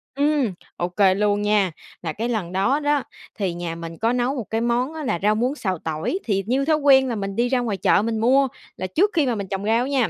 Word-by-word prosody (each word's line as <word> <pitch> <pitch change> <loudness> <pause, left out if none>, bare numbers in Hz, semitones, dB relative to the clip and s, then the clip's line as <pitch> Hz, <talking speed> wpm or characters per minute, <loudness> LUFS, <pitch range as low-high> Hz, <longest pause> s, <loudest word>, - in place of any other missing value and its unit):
Ừm, 285 -7 +1 0.2
ô 175 +1 -1
kê 190 0 +3
luôn 205 0 +1
nha, 205 -3 +2 0.3
là 160 -3 -3
cái 230 +3 -3
lần 195 -7 -2
đó 200 +10 +1
đó, 290 -2 +1 0.3
thì 190 -5 -2
nhà 170 -1 -4
mình 165 0 -8
có 230 +5 +1
nấu 250 +3 0
một 245 - -3
cái 225 +1 -1
món 245 +5 0
á 315 -1 -6
là 175 - -1
rau 210 +1 +3
muống 250 +6 0
xào 185 - -2
tỏi, 160 - -2
thì 195 -3 0
như 265 +4 +1
thói 315 - +3
quen 270 -2 +5
là 235 - -2
mình 195 -1 -4
đi 245 +1 +1
ra 255 -1 +2
ngoài 220 -5 -2
chợ 195 - +3
mình 225 0 -1
mua, 265 +4 +4 0.3
là 185 - -3
trước 375 - +2
khi 315 -4 +2
mà 245 -3 0
mình 200 -2 -4
trồng 195 +1 -3
rau 230 +3 +2
á - - -3
nha. 265 -5 +1
225 Hz, 270 wpm, -22 LUFS, 195-265 Hz, 0.3 s, quen